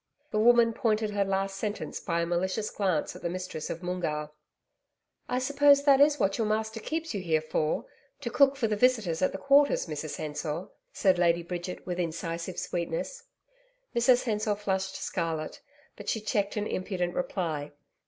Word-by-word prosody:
The 215 - +1
woman 235 0 +5
pointed 215 -2 0
her 205 -1 +1
last 195 0 -1
sentence 210 +1 -3
by 170 -2 -1
a - - +1
malicious 185 +5 -1
glance 185 -7 0
at - - -10
the 170 - -2
mistress 180 -3 -5
of 170 - -5
Moongarr. 155 -4 -2 1.0
'I 250 - 0
suppose 280 +2 +4
that 280 -1 +6
is 290 0 +5
what 195 +2 +1
your 220 - +1
master 220 +1 -1
keeps 320 +5 -3
you 200 - -2
here 160 -3 +2
for 155 0 -1 0.4
to - - -3
cook 280 -1 +5
for 255 -5 0
the 215 - 0
visitors 210 -8 +2
at 185 - +3
the - - -5
Quarters, 280 +5 +4
Mrs 155 -1 -5
Hensor,' 155 +3 -4 0.2
said 185 -3 +2
Lady 170 -1 +3
Bridget, 175 +1 -5
with 180 -1 -3
incisive 170 +1 -3
sweetness. 175 - -3 0.7
Mrs 240 +1 +4
Hensor 215 -2 0
flushed 190 -2 -2
scarlet, 165 -3 -3 0.3
but - - -6
she 220 - 0
checked 210 0 -1
an 210 - 0
impudent 185 -3 -2
reply. 160 -5 -2
190 Hz, 175 wpm, -29 LUFS, 170-225 Hz, 1.0 s, that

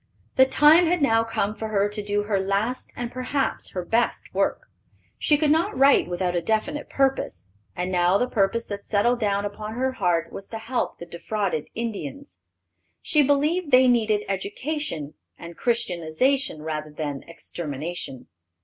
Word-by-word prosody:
The 260 0 +6
time 310 +6 +6
had 355 +1 +2
now 225 -6 +3
come 210 -2 -1
for 220 0 -5
her 205 -1 +1
to 210 +1 -4
do 205 0 -1
her 205 -2 0
last 200 +6 -1
and 240 -1 -4
perhaps 255 +2 -2
her 180 -2 -3
best 230 +6 0
work. - - 0 0.6
She 295 - +3
could 300 0 +2
not 320 -3 +1
write 275 +2 +5
without 180 0 -1
a 175 - +1
definite 250 - -1
purpose, 270 - 0 0.3
and 180 +1 -2
now 180 +1 +3
the 245 - +1
purpose 230 -1 0
that 200 -1 -6
settled 235 +4 +1
down 200 -2 0
upon 210 +2 -6
her 260 +2 0
heart 175 -8 0
was 195 - -7
to 225 - -5
help 240 +3 -2
the 170 - -8
defrauded 175 -1 -3
Indians. 175 - -5 0.6
She 300 - +4
believed 295 +5 +2
they 255 -1 +6
needed 220 -4 +3
education 200 - -3 0.2
and 170 0 -10
Christianization 230 - 0
rather 155 -1 -4
than 150 -2 -4
extermination. 160 -4 -6
210 Hz, 160 wpm, -24 LUFS, 175-255 Hz, 0.6 s, The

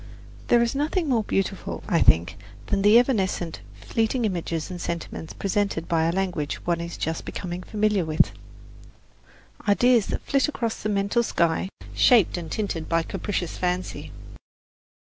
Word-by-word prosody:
There 235 0 +5
is 235 - 0
nothing 305 +5 0
more 235 -5 +2
beautiful, 195 -1 -2
I 170 - +2
think, 85 +3 +4 0.3
than 200 - 0
the 205 +3 +7
evanescent 195 -9 +1 0.2
fleeting 225 - -1
images 170 -3 -2
and 175 -1 -6
sentiments 170 -1 -5
presented 195 -4 -1
by 165 -2 +2
a 165 - +2
language 175 -5 -1
one 170 -1 0
is 170 0 -6
just 160 0 -2
becoming 180 -1 -5
familiar 210 -1 0
with 155 -1 +2 1.4
ideas 235 +1 +4
that - - -3
flit 275 -1 +2
across 235 -6 -3
the 215 - -2
mental 200 +3 +1
sky, 170 -4 0 0.2
shaped 235 -7 +5
and 170 -3 -6
tinted 185 -7 -3
by 165 0 +2
capricious 180 -1 -3
fancy. 180 0 -2
190 Hz, 150 wpm, -25 LUFS, 170-220 Hz, 1.4 s, the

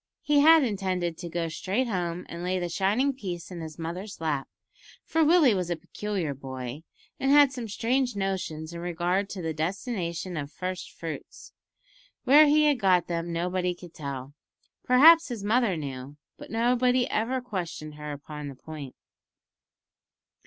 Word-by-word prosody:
He 295 -1 +3
had 320 +1 +7
intended 185 -6 -1
to 175 - -6
go 170 0 -2
straight 195 +9 -1
home 180 -4 -2
and 170 - -7
lay 185 +1 0
the 175 -1 -2
shining 210 +10 +1
piece 185 -9 -6
in 175 -2 -6
his 160 -1 -8
mother's 180 +5 -6
lap, 150 -4 -1 0.6
for 325 +1 +2
Willie 310 -6 +5
was 180 -3 -2
a 175 - 0
peculiar 180 -1 -4
boy, 130 0 -7 0.4
and 270 - 0
had 285 -1 +7
some 245 -4 -5
strange 245 +3 0
notions 180 -5 -3
in 170 - -6
regard 175 +3 -1
to 185 -3 -6
the 160 -1 -2
destination 175 - -3
of 145 -1 -5
"first 185 +1 -5
fruits." 160 -4 -8 0.7
Where 290 +4 +7
he 300 +1 +5
had 290 -4 +3
got 180 -3 +3
them 170 0 -3
nobody 180 +1 -1
could 175 -1 -13
tell. 140 -2 -6 0.5
Perhaps 320 +6 +7
his 235 -5 -5
mother 215 -3 +2
knew, 140 -1 -6 0.2
but - - -12
nobody 245 +2 +2
ever 245 +4 0
questioned 175 -10 -5
her 150 0 -7
upon 145 +1 -7
the 140 - -8
point. 145 -1 -9
180 Hz, 160 wpm, -27 LUFS, 160-240 Hz, 0.7 s, had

